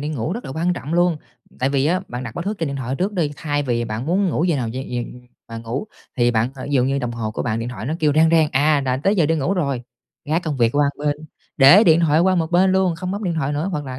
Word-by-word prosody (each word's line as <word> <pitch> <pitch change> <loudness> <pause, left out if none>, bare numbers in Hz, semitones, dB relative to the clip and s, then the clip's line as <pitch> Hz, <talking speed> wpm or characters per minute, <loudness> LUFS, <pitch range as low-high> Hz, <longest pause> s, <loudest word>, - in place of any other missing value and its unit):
đi 150 - -3
ngủ 150 0 -3
rất 235 +5 -6
là - - -7
quan 170 +4 0
trọng 160 -2 -4
luôn. 175 -1 +2 0.4
Tại 130 - +1
vì 140 0 +1
á 180 +3 +1
bạn 125 +1 -5
đặt 115 - -7
báo 170 - -4
thức 205 +3 -4
trên 165 - -1
điện 140 -1 -4
thoại 130 -1 -3
trước 195 +3 -1
đi, 170 -6 0
thay 145 -2 -2
vì 120 -3 -1
bạn 110 +3 -5
muốn 190 +5 +1
ngủ 165 -1 0
giờ 170 -4 +1
nào 125 -4 -2
giờ 125 +4 -5
giờ 120 -1 -2 0.5
mà 115 0 -6
ngủ 115 - -4 0.3
thì 120 -1 +3
bạn 115 +1 0
thời 135 - -8
ví 145 - -1
dụ 125 -1 +3
như 135 +1 0
đồng 125 -3 -3
hồ 115 -2 -4
của 110 - -4
bạn 110 -1 -1
điện 115 - -4
thoại 125 -2 -7
nó 155 - -1
kêu 150 -2 +3
reng 160 +2 +4
reng, 160 -2 +4
à, 145 +2 +3
là 130 0 0
tới 195 +10 +1
giờ 170 -5 +3
đi 165 - +1
ngủ 160 +6 0
rồi, 140 -9 -1 0.4
gác 160 +4 0
công 155 -4 -3
việc 120 -2 +3
qua 145 - +4
một 145 +1 -3
bên, 145 -1 +1 0.4
để 155 +11 +8
điện 165 -1 +5
thoại 160 -1 +3
qua 185 +1 +3
một 165 -2 -1
bên 185 +2 +3
luôn, 190 -2 +2
không 180 +2 -4
bấm 205 +1 -4
điện 170 -2 -1
thoại 145 -2 -1
nữa 150 +5 -2
hoặc 150 -2 -3
là 130 -1 -7
145 Hz, 315 wpm, -21 LUFS, 130-170 Hz, 0.5 s, để